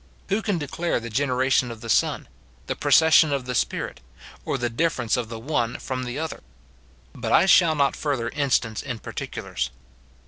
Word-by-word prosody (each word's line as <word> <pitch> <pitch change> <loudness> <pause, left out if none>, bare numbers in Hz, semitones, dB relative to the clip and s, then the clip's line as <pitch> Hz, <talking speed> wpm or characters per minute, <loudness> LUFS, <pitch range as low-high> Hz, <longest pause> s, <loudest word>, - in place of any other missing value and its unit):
Who 200 +3 +1
can 200 -3 -1
declare 165 +2 -2
the 115 0 -7
generation 130 0 +1
of 115 -2 -8
the 115 - -8
Son, - - +1 0.4
the - - -3
procession 160 -1 +5
of 140 -3 -1
the 125 - -3
Spirit, 60 - -2 0.5
or - - -1
the 120 - -1
difference 125 -2 0
of 120 -3 -3
the 115 - -6
one 120 -1 -1
from 130 -1 -4
the 125 +2 -5
other? 160 +1 -4 0.7
But - - -4
I 170 - +6
shall 170 -4 +5
not 140 -2 +2
further 135 -6 -2
instance 125 -6 0
in 120 -4 -5
particulars. 65 - -5
130 Hz, 175 wpm, -24 LUFS, 115-155 Hz, 0.7 s, I